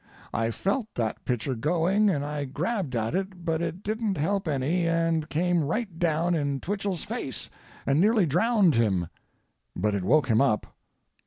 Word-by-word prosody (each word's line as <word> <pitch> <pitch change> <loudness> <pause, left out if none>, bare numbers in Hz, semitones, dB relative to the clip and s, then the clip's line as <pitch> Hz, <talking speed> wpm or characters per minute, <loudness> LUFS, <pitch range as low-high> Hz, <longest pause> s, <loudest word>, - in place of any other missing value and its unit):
I 115 0 0
felt 200 - -1
that 110 -3 -2
pitcher 125 +2 -1
going 175 - +2
and 145 -6 0
I 145 -1 -3
grabbed 160 - -2
at 115 +2 -1
it, 190 -1 -3
but 165 -1 0
it 175 +3 -4
didn't 215 -2 -1
help 190 +5 0
any 155 +5 +1
and 165 -2 +1
came 175 +1 +1
right 180 +2 -3
down 170 +1 +1
in 140 -4 0
Twichell's 195 -1 -2
face - - -4 0.3
and 140 +4 +3
nearly 215 -1 +4
drowned 190 - +3
him. 95 -8 +1 0.7
But 105 0 0
it 100 - 0
woke 145 +7 +3
him 115 -1 +3
up. 120 -6 +1
165 Hz, 165 wpm, -27 LUFS, 135-190 Hz, 0.7 s, nearly